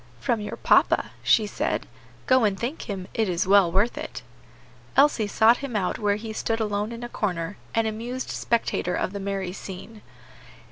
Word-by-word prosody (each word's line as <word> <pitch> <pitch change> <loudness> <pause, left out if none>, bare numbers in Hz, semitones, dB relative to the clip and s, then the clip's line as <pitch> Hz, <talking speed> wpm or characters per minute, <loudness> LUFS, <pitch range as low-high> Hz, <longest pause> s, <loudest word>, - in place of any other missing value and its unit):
"From 220 - 0
your 210 - -5
papa," - - +3
she 220 - +4
said. 205 - -2 0.4
"Go 260 -2 +4
and 200 -3 +1
thank 250 +2 -4
him: 190 -2 -4
it 220 -3 +1
is 180 +2 0
well 195 -2 +5
worth 205 +7 +1
it." - - -6 0.7
Elsie 270 -6 +4
sought 225 +3 +5
him 275 -5 -6
out 190 -3 0
where 205 -1 +2
he 220 +1 -6
stood 225 +1 -1
alone 210 0 -1
in 235 +1 -7
a - - -3
corner, 185 -5 -2 0.2
an 225 0 +3
amused 235 +4 -4
spectator 225 -6 0
of 185 - -2
the 200 - -4
merry 195 -2 -3
scene. 200 +3 -9
210 Hz, 180 wpm, -25 LUFS, 195-230 Hz, 0.7 s, well